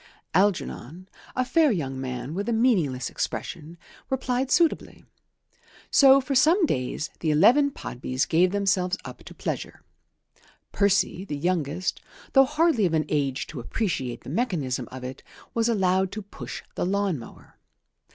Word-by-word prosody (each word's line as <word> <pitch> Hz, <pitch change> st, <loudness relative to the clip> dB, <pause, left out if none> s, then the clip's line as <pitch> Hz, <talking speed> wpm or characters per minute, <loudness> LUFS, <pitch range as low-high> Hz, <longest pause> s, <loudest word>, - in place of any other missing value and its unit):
Algernon, 185 Hz, -4 st, 0 dB, 0.3 s
a 255 Hz, -, +1 dB
fair 315 Hz, +1 st, +3 dB
young 135 Hz, -9 st, -3 dB
man 125 Hz, +2 st, -5 dB
with 200 Hz, +6 st, -3 dB
a -, -, +1 dB
meaningless 185 Hz, -, +2 dB
expression, 165 Hz, -1 st, -5 dB, 0.3 s
replied 260 Hz, 0 st, -1 dB
suitably. 335 Hz, 0 st, +1 dB, 0.9 s
So 275 Hz, -1 st, +7 dB
for 275 Hz, +1 st, -3 dB
some 325 Hz, +8 st, +5 dB
days 130 Hz, -, -2 dB
the 160 Hz, -, -1 dB
eleven 235 Hz, -, +5 dB
Podbys 130 Hz, -, -3 dB
gave 175 Hz, +3 st, +3 dB
themselves 195 Hz, -1 st, +1 dB
up -, -, -9 dB
to -, -, -11 dB
pleasure. -, -, -5 dB, 0.9 s
Percy, 200 Hz, -2 st, +1 dB
the 150 Hz, -7 st, -4 dB
youngest, 175 Hz, +2 st, -1 dB, 0.3 s
though 270 Hz, -1 st, +7 dB
hardly 295 Hz, -, +2 dB
of 165 Hz, -, -1 dB
an 155 Hz, -, +1 dB
age 140 Hz, -3 st, 0 dB
to -, -, -8 dB
appreciate 130 Hz, -, -3 dB
the -, -, -8 dB
mechanism 150 Hz, -, -1 dB
of 130 Hz, 0 st, -8 dB
it, 130 Hz, +1 st, -7 dB, 0.3 s
was 230 Hz, 0 st, +1 dB
allowed 190 Hz, -3 st, +2 dB
to 215 Hz, 0 st, -5 dB
push 200 Hz, -, -8 dB
the -, -, -2 dB
lawn 195 Hz, -3 st, 0 dB
mower. 115 Hz, -, -14 dB
185 Hz, 145 wpm, -25 LUFS, 145-235 Hz, 0.9 s, So